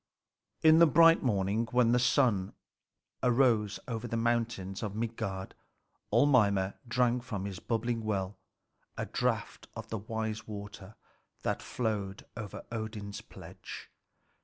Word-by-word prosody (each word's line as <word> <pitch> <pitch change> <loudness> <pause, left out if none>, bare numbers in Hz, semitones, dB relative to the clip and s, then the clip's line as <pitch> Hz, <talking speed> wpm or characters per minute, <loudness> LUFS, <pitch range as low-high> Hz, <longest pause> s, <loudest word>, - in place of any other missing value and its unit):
In 160 0 +7
the 170 - +8
bright 165 +3 +6
morning, 105 -1 +1
when 120 -2 +4
the 125 - +4
sun 120 -7 +2 0.7
rose 120 -5 +3
over 120 -1 -3
the 115 - -2
mountains 115 -5 -1
of 105 -3 -4
Midgard, 105 -4 -3 0.6
old 120 +7 +5
Mimer 100 -7 +3
drank 125 +1 +2
from 105 -6 -4
his 95 -3 -5
bubbly 120 +1 -1
well 100 -3 -3 0.6
a - - -2
draught - - -2
of - - -7
the 110 - -3
wise 110 +1 -4
water 105 -1 -8 0.5
that - - -1
flowed 105 -5 -3
over 110 -4 -7
Odin's 110 -3 -5
pledge. - - -10
110 Hz, 130 wpm, -31 LUFS, 100-120 Hz, 0.7 s, the